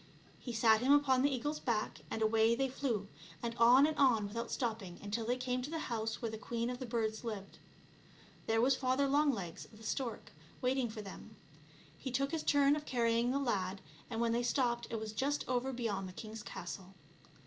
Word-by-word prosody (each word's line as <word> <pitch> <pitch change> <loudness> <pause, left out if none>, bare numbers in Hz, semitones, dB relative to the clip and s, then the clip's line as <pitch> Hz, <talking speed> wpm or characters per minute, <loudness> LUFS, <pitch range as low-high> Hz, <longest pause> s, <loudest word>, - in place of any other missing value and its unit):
He 245 - -6
sat 220 -1 +4
him 260 +3 +3
upon 270 -3 +4
the 285 - +4
eagle's 290 +3 -2
back, 215 -9 -1
and 220 - -1
away 220 +1 +4
they 270 +2 0
flew, 240 -7 -2 0.4
and 235 -1 -2
on 245 +4 +8
and 310 0 0
on 235 -7 +4
without 230 +3 -4
stopping 220 -7 -3
until 215 +2 -3
they 245 +1 +1
came 250 0 -1
to 260 - -5
the 325 - -3 0.2
house 225 0 -2
where 230 -2 -3
the 220 - -6
queen 235 +1 -2
of 250 - -5
the 255 - -5
birds 225 -1 -1
lived. 210 -4 -6 0.9
There 225 0 +3
was 265 +2 +4
Father 260 +2 +1
Longlegs 270 - 0
(the 220 0 -14
stork) 245 +1 -3 0.3
waiting 255 -1 +1
for 215 -1 -7
them. 195 - -10 0.6
He 265 - -4
took 275 +2 0
his 325 -2 -1
turn 285 -1 +4
of 300 0 -6
carrying 235 -1 +2
the 265 - +1
lad, 195 -8 -1 0.3
and 225 -2 -3
when 230 0 +2
they 235 +1 +1
stopped 240 -1 +1
it 225 - -2
was 215 -1 -5
just 280 +5 -1
over 255 +1 0
beyond 210 -7 -2
the - - -10
king's 215 +2 -7
castle. 190 0 -7
235 Hz, 205 wpm, -34 LUFS, 220-260 Hz, 0.9 s, on